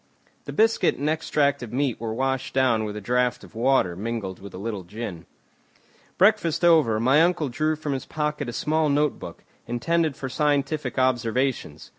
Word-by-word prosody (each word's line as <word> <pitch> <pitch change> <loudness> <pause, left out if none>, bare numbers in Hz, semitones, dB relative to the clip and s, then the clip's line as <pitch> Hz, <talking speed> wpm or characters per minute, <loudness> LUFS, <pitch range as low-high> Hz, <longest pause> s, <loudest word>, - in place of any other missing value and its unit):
The - - -6
biscuit 225 +1 +2
and 145 - -2
extract 150 -3 +1
of 120 -3 -7
meat 130 -3 -1
were 115 -1 -3
washed 130 +3 -2
down 120 -5 +2
with 105 -1 -5
a - - -6
draught 125 +3 0
of - - -14
water 115 -6 +2
mingled 105 -2 -4
with 100 0 -10
a - - -6
little 105 0 -4
gin. 95 -2 -7 0.9
Breakfast 180 -5 +3
over, 155 -11 +4
my 130 +7 +4
uncle 170 -4 +1
drew 155 +6 0
from 150 -2 -4
his 135 - -5
pocket 150 -3 -2
a - - -3
small 155 +5 +1
notebook, 145 0 -1 0.2
intended 155 +6 0
for 135 -2 -5
scientific 145 0 -1
observations. 125 - 0
130 Hz, 170 wpm, -24 LUFS, 115-150 Hz, 0.9 s, over